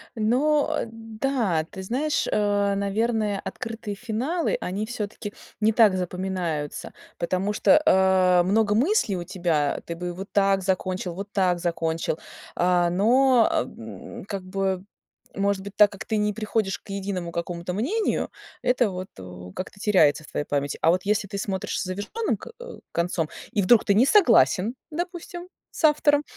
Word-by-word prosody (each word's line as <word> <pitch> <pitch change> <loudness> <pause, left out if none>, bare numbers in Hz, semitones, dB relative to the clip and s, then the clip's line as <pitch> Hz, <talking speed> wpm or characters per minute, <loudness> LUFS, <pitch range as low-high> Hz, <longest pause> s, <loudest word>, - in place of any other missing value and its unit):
Но, 265 +7 +2
э, - - -3
да, 225 - -1
ты 190 - -7
знаешь, 270 +10 -1
э, 205 -1 +1
наверное, 210 +1 0
открытые 225 -2 -5
финалы, 245 - -1
они 195 +4 -2
всё-таки 210 -2 -5 0.3
не 220 0 +3
так 215 -4 +5
запоминаются, 180 -4 -3 0.2
потому 185 +4 -1
что, 300 +7 +5
э, 185 -3 +4
много 205 +2 +2
мыслей 255 - +2
у 175 - -4
тебя, 165 -5 0
ты 170 - -4
бы 175 +1 -4
вот 190 +3 -7
так 195 -1 +3
закончил, 185 -1 -2
вот 200 +2 -7
так 185 -3 +2
закончил, 165 -2 -1 0.4
а, 175 -1 +3
но, 240 +5 +4
м, 110 -5 -5
как 195 -2 -5
бы 190 0 -2 0.5
может 200 0 0
быть, 200 0 -9
так 210 -1 +6
как 200 - -8
ты 220 - -1
не 210 0 +1
приходишь 215 -2 -1
к - - -24
единому 190 -3 -3
какому-то 170 +1 -4
мнению, 325 - 0 0.3
это 245 -4 +2
вот, 185 0 -5
э, 90 -1 -10
как-то 190 +2 -6
теряется 155 -9 +3
в - - -14
твоей 145 - -3
памяти. 140 -1 -2
А 165 - +4
вот 180 +1 0
если 210 0 +1
ты 200 0 -5
смотришь 195 -2 -2
с - - -1
завершённым 205 - -2
ко - - -11 0.4
концом 170 -2 -1 0.2
и 210 -5 +1
вдруг 220 +4 +5
ты 200 - +2
не 230 +5 +5
согласен, 230 - +4 0.2
допустим, 350 +2 -5 0.2
с - - -8
автором, 295 -1 +4
200 Hz, 160 wpm, -25 LUFS, 180-225 Hz, 0.5 s, так